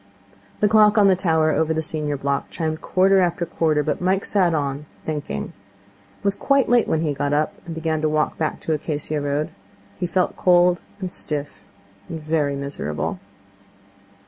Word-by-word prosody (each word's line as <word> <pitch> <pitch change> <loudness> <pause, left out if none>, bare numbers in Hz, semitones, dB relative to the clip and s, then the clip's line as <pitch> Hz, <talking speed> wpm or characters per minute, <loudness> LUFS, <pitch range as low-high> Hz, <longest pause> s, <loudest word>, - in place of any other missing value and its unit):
The 210 - +5
clock 215 0 +5
on 200 -2 +6
the 190 - +5
tower 160 -4 +2
over 160 +1 +1
the 160 - -1
senior 150 -2 -2
block 140 0 -2
chimed 160 -1 -3
quarter 190 +1 +3
after 175 -1 +1
quarter, 155 -2 +1
but 155 - -2
Mike 190 +2 +1
sat 185 -4 +2
on, 145 0 -2 0.2
thinking. 145 - -4 0.7
It - - -30
was 200 0 +2
quite 275 +3 +2
late 240 -2 +3
when 160 - +1
he 155 -3 0
got 145 +1 -1
up, 150 +1 +1
and 165 - -5
began 160 -1 -1
to 155 - +1
walk 155 0 0
back 155 -1 -2
to 160 - -1
Acacia 150 0 -2
Road. 145 +1 -1 0.5
He 180 - -1
felt 180 +1 0
cold 175 -1 +4 0.2
and 185 -2 -4
stiff 145 -10 -5 0.5
and 165 - -5
very 155 -2 0
miserable. 115 - -4
160 Hz, 175 wpm, -22 LUFS, 150-180 Hz, 0.7 s, on